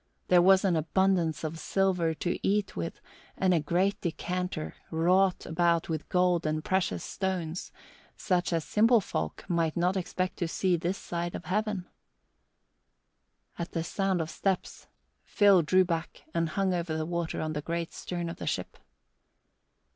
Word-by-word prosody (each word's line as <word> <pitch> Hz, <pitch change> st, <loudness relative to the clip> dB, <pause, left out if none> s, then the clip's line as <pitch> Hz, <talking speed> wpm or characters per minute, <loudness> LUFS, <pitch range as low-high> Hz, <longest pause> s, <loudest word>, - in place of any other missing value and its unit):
There 180 Hz, -1 st, +7 dB
was 190 Hz, +2 st, +5 dB
an 180 Hz, -3 st, +3 dB
abundance 165 Hz, 0 st, +1 dB
of 160 Hz, +1 st, -4 dB
silver 180 Hz, -4 st, +1 dB
to 175 Hz, +3 st, -2 dB
eat 205 Hz, 0 st, 0 dB
with 85 Hz, -, -4 dB, 0.4 s
and 185 Hz, -1 st, +3 dB
a 170 Hz, -, +3 dB
great 180 Hz, +6 st, 0 dB
decanter, 180 Hz, -1 st, -3 dB, 0.2 s
wrought 180 Hz, +3 st, +2 dB
about 170 Hz, 0 st, +1 dB
with 160 Hz, -2 st, -3 dB
gold 180 Hz, -3 st, +2 dB
and 155 Hz, 0 st, -1 dB
precious 190 Hz, -1 st, 0 dB
stones, 180 Hz, -3 st, -3 dB, 0.5 s
such 180 Hz, -1 st, 0 dB
as 165 Hz, -2 st, 0 dB
simple 230 Hz, +2 st, +4 dB
folk 80 Hz, -, -4 dB
might 165 Hz, -2 st, 0 dB
not 180 Hz, +2 st, +2 dB
expect 185 Hz, 0 st, -2 dB
to 175 Hz, -, -1 dB
see 180 Hz, +2 st, +1 dB
this 175 Hz, +3 st, -2 dB
side 170 Hz, 0 st, -4 dB
of 170 Hz, -, -7 dB
Heaven. 205 Hz, 0 st, -1 dB, 1.7 s
At 170 Hz, -, -4 dB
the 165 Hz, -, -1 dB
sound 190 Hz, 0 st, 0 dB
of 160 Hz, +1 st, -4 dB
steps, 190 Hz, -2 st, -2 dB, 0.4 s
Phil 200 Hz, -4 st, +5 dB
drew 185 Hz, +4 st, +4 dB
back 165 Hz, -2 st, -4 dB
and 165 Hz, -1 st, 0 dB
hung 190 Hz, +2 st, 0 dB
over 170 Hz, -2 st, -2 dB
the 155 Hz, -, -2 dB
water 170 Hz, 0 st, -2 dB
on 155 Hz, 0 st, -2 dB
the 150 Hz, -, -3 dB
great 170 Hz, +2 st, -3 dB
stern 175 Hz, -1 st, -4 dB
of 165 Hz, -, -6 dB
the -, -, -6 dB
ship. -, -, -3 dB
175 Hz, 160 wpm, -29 LUFS, 165-190 Hz, 1.7 s, There